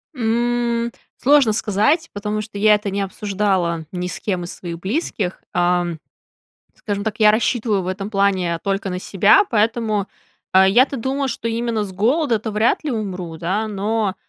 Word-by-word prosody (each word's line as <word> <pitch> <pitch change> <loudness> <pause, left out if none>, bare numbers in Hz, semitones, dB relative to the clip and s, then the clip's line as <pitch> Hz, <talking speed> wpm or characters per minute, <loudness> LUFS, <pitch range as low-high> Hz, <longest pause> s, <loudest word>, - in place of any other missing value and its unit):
М, 235 0 0 0.3
сложно 275 -5 +4
сказать, 220 - +1
потому 210 +1 -3
что 215 -1 -9
я 210 +1 +5
это 205 -1 -3
не 200 +1 -2
обсуждала 190 -4 -1
ни 180 -1 -3
с - - -5
кем 185 -4 -2
из 175 - -6
своих 170 -2 -7
близких, 195 - -2
а, 175 0 +2 0.9
скажем 205 -2 -4
так, 220 -1 -3
я 215 -1 +6
рассчитываю 220 -2 +1
в - - -7
этом 195 +2 -4
плане 190 -4 +1
только 195 0 -1
на 180 - -3
себя, 200 - +4
поэтому, 220 -2 +1 0.5
э, 190 0 +7
я-то 255 +7 +4
думаю, 270 +3 -2
что 230 -1 -3
именно 230 -1 -1
с 195 - -8
голода-то 230 - +1
вряд 215 +8 +1
ли 295 - -1
умру, 185 -7 -4
да. 190 +7 -1
Но, 210 -1 -1
210 Hz, 165 wpm, -20 LUFS, 190-230 Hz, 0.9 s, э